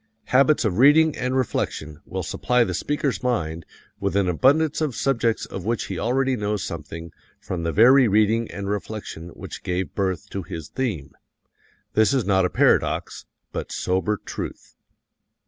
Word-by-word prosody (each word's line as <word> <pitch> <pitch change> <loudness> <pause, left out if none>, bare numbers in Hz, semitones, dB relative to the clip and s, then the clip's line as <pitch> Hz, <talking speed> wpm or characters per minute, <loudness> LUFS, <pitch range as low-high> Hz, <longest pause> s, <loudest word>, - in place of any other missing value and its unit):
Habits 140 0 +4
of 95 -2 0
reading 150 +3 +6
and 125 +1 -1
reflection 75 - -2
will - - -4
supply 125 -1 +1
the 95 - -3
speaker's 135 - -1
mind 85 -10 -2 0.3
with 100 -1 -1
an 100 -2 +2
abundance 140 - +3
of 150 -6 -1
subjects 120 -4 0
of 95 - -7
which 115 +2 -1
he 95 -4 -5
already 130 +4 +1
knows 105 -2 -2
something 80 0 -7 0.3
from 90 -2 -4
the 85 0 -1
very 125 +6 +6
reading 110 +2 +2
and 100 -1 -6
reflection 100 -4 -5
which - - -8
gave 90 +1 -3
birth 95 -3 -2
to 100 - -3
his 80 -2 -7
theme. 100 - -3 0.8
This 110 +5 +3
is 130 - +1
not 95 -2 +3
a - - +1
paradox, - - +1 0.2
but - - -5
sober 95 +4 0
truth. - - -7
105 Hz, 160 wpm, -23 LUFS, 90-130 Hz, 0.8 s, reading